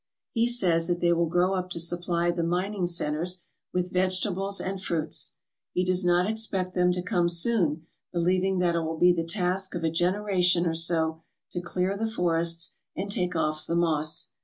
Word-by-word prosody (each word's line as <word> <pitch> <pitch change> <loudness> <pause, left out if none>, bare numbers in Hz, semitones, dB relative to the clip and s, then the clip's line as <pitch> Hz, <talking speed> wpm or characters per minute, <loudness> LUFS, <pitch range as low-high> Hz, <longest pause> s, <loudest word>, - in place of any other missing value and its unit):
He 230 0 +1
says 180 -9 +3
that 175 -1 0
they 170 0 +3
will 170 0 +1
grow 180 +3 +1
up 185 -1 -2
to 175 - -1
supply 175 0 +1
the 175 0 -2
mining 180 +3 -1
centres 170 +1 -1 0.3
with 180 0 -2
vegetables 190 +1 +1
and 190 0 -4
fruits. 160 -4 -2 0.4
He 180 - +1
does 185 0 +2
not 175 +1 +3
expect 205 -4 -1
them 180 0 +3
to 180 0 -2
come 180 -3 +1
soon, 170 -4 +1 0.3
be 175 - -5
lieving 185 +2 +1
that 175 -1 +2
it 170 - +1
will 160 0 -3
be 180 +2 +5
the 165 -1 -1
task 185 +2 0
of 170 - -4
a 160 - +1
generation 180 0 +1
or 165 - 0
so 160 -1 +2 0.3
to 175 - -4
clear 180 +2 -1
the 220 +2 -2
forests 170 -4 -1 0.2
and 200 +2 -4
take 180 -3 -1
off 155 -1 -1
thfe 170 - 0
moss. 155 -2 +1
175 Hz, 190 wpm, -27 LUFS, 170-185 Hz, 0.4 s, be